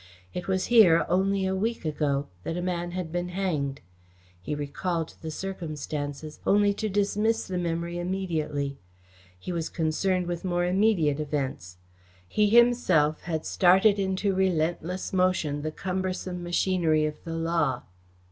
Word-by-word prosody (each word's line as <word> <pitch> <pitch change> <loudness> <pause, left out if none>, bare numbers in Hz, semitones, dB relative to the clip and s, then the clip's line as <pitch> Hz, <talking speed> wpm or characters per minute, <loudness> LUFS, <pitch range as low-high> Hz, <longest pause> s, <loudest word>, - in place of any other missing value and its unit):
It 180 - -5
was 190 -1 0
here, 180 -8 +7
only 190 +2 +1
a 190 - 0
week 220 0 -2
ago, 145 -2 0 0.2
that 165 - -3
a - - -2
man 175 -1 -2
had 175 -2 -4
been 175 +1 -2
hanged. 155 -8 -2 0.6
He 150 - -3
recalled 160 +3 -3
the 160 - -5
circumstances, 155 -4 -5
only 205 0 +4
to 215 +1 -3
dismiss 205 +3 +1
the 185 -1 -3
memory 170 0 -2
immediately. 160 -6 -2 0.6
He 135 - -6
was 165 -2 -2
concerned 180 +3 0
with 175 -1 -4
more 175 -1 0
immediate 180 -6 +2
events. 135 -12 -3 0.5
He 210 - +2
himself 215 -10 +4
had 160 -2 -2
started 190 +3 +4
into 190 +1 0
relentless 180 -1 -1
motion 180 -6 +1
the 155 - -2
cumbersome 185 0 -3
machinery 175 -3 +1
of 150 0 -5
the 165 -1 -5
law. 165 -6 0
175 Hz, 140 wpm, -27 LUFS, 155-190 Hz, 0.6 s, here